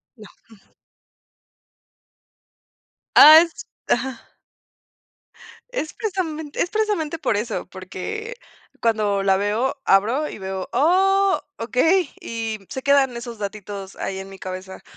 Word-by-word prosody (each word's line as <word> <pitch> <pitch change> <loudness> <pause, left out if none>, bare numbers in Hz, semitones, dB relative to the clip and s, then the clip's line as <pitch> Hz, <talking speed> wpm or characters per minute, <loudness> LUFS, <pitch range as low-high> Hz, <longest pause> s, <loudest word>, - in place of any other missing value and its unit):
No, 215 -3 -13 0.2
jum. 220 -3 -19 2.6
Ah, 310 +2 +11
es 335 - -9 0.2
Ajá. 250 -1 0 1.5
Es - - -4
precisamente 325 -8 -3
es 345 - 0
precisamente 405 -8 -1
por 255 -9 0
eso, 215 +1 -3
porque 315 - -7 0.5
cuando 210 -3 +1
la 190 -1 +3
veo 210 +6 0
abro, 230 +10 +2
y - - -8
veo, 190 -1 -5
"Oh, 385 +5 +3 0.2
okey", 305 +9 +2
y 225 -2 -4
se 265 - -6
quedan 275 -3 +3
esos 235 -2 -8
datitos 200 -1 -6
ahí 190 0 -4
en 195 0 -8
mi 195 - -11
cabeza, 185 0 -8
235 Hz, 115 wpm, -22 LUFS, 200-320 Hz, 2.6 s, Ah